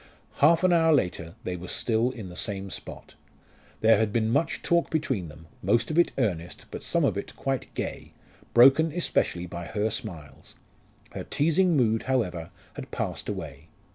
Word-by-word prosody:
Half 165 +6 +5
an 185 -1 +5
hour 165 -1 +4
later 90 - 0
they 90 - -3
were 90 +1 -8
still 115 +4 +1
in 115 -7 -8
the 90 - -10
same 95 0 -4
spot. - - -8 0.7
There 110 -1 +5
had 110 -2 +1
been 110 0 +1
much 155 +6 0
talk 170 0 +2
between 130 - -1
them, 75 +1 -13 0.2
most 115 - +1
of 160 - +2
it 175 - +4
earnest, 90 -9 -2
but - - -6
some - - +1
of - - +1
it - - -8
quite 135 -1 -3
gay, - - -5 0.4
broken 135 +7 +7
especially 145 - 0
by 85 0 -7
her 105 +4 -1
smiles. 80 -9 -7 0.6
Her - - -6
teasing 165 +3 +2
mood, 115 -3 +2
however, 90 -11 -1 0.2
had - - -8
passed - - -4
away. 75 +4 -6
115 Hz, 170 wpm, -27 LUFS, 90-145 Hz, 0.7 s, broken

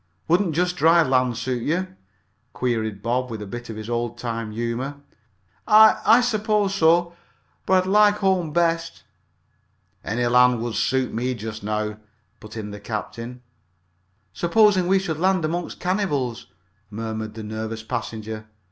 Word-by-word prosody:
"Wouldn't 175 -1 +2
just 180 +1 0
dry 165 0 +5
land 130 -4 +1
suit 125 0 -2
you?" 185 +8 -2 0.6
queried 110 -5 -2
Bob, 125 +2 -1
with 110 -2 -5
a 105 - -6
bit 120 +4 -8
of 110 - -6
his 110 0 -7
old 120 0 -2
time 115 -2 -4
humor. 120 +5 -3 0.7
"I 215 0 +7
I 230 +3 +6
suppose 215 -4 +1
so, 170 -1 +3 0.5
but 185 -1 +4
I'd - - -9
like 210 0 +5
home 190 -5 0
best." 165 0 0 1.0
"Any 120 +3 -1
land 125 0 +4
would 120 -1 -3
suit 130 +1 0
me 125 +3 -1
just 110 -1 -7
now," 105 +1 -3 0.4
put 105 +1 -11
in 105 -1 -5
the 105 - -8
captain. 115 +3 -6 0.9
"Supposing 190 0 +3
we 195 +1 +4
should 170 -5 -3
land 185 -2 +2
among 170 +2 -2
cannibals!" 150 - -2 0.4
murmured 110 0 -5
the 110 - -7
nervous 110 +1 -5
passenger. 110 -2 -5
125 Hz, 145 wpm, -23 LUFS, 110-180 Hz, 1.0 s, I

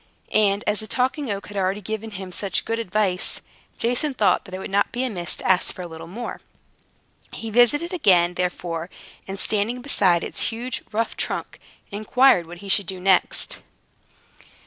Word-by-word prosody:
And, 205 -1 +3
as 210 0 +1
the 215 - -4
Talking 260 +4 0
Oak 200 -1 -3
had 205 - -7
already 195 +1 +1
given 220 +2 -4
him 190 -3 -6
such 195 +2 -1
good 230 0 -1
advice, 195 -3 0 0.4
Jason 250 +4 +1
thought 210 -5 +3
that 185 - -12
it - - -3
would 190 - -6
not 200 +1 +2
be 245 - -1
amiss 190 -9 -2
to - - -5
ask 185 -1 +2
for 180 - -6
a - - -5
little 165 0 -9
more. 230 +8 -6 0.9
He 225 -1 -5
visited 270 - +4
it - - 0
again, 175 - +4
therefore, 175 -1 -2 0.4
and 195 0 -5
standing 220 +5 0
beside 185 -11 +3
its - - -2
huge, 240 +3 -4
rough 225 +1 -1
trunk, - - -3 0.3
inquired 215 -2 +4
what 175 +1 -9
he - - -7
should 195 -1 +1
do 185 0 -5
next. 185 0 +2
205 Hz, 180 wpm, -24 LUFS, 185-230 Hz, 0.9 s, visited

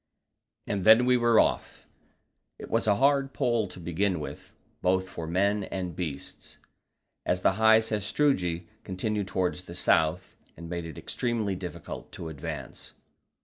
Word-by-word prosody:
And 100 -2 -2
then 110 +4 +7
we 125 0 +4
were 120 -2 +4
off: - - 0 0.7
It - - -10
was - - +1
a 105 - +5
hard 135 +2 +2
pull 115 -4 +1
to 90 - -11
begin 90 +2 0
with, 75 - -8 0.3
both 95 +1 +2
for 85 -3 -6
men 100 +4 +1
and 90 -4 -4
beasts, 80 -6 -6 0.7
as 90 - 0
the - - +4
high 110 0 +8
sastrugi 105 - 0 0.2
continued 100 +1 -2
towards 90 -2 -1
the 85 -1 -10
south, 90 0 +1 0.2
and 85 +1 -8
made 85 0 -4
it 80 - -9
extremely 115 -5 -2
difficult 90 -1 -7
to 80 - -6
advance. 75 -2 -7
95 Hz, 145 wpm, -28 LUFS, 85-110 Hz, 0.7 s, high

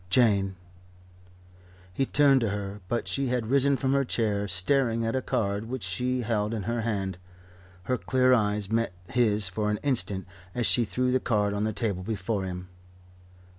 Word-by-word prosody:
Jane 100 -3 +3 0.7
" 90 0 -25
He 135 +7 0
turned 140 -3 +4
to 115 - +1
her, 100 0 -5
but 120 +3 -2
she 135 -1 -1
had 120 -2 -1
risen 140 0 +4
from 135 0 0
her 140 0 +3
chair, 105 -5 -1
staring 115 +5 +1
at 115 - -1
a 130 - +1
card 100 -3 -1
which 125 +1 -5
she 125 +8 -1
held 110 -1 -1
in 105 - -3
her 115 +3 -1
hand. 95 -5 -2 0.6
Her 125 +6 -1
clear 130 -1 +3
eyes 105 -3 +1
met 115 -4 0 0.2
his 110 -5 +3
for 105 +3 -2
an 105 - 0
instant 100 -9 0 0.3
as 120 - 0
she 120 +1 +5
threw 125 +5 0
the 130 - +3
card 105 -4 0
on 105 +1 -1
the 110 - 0
table 100 -3 -2
before 100 0 -2
him. 90 0 -6
110 Hz, 180 wpm, -27 LUFS, 95-125 Hz, 0.7 s, she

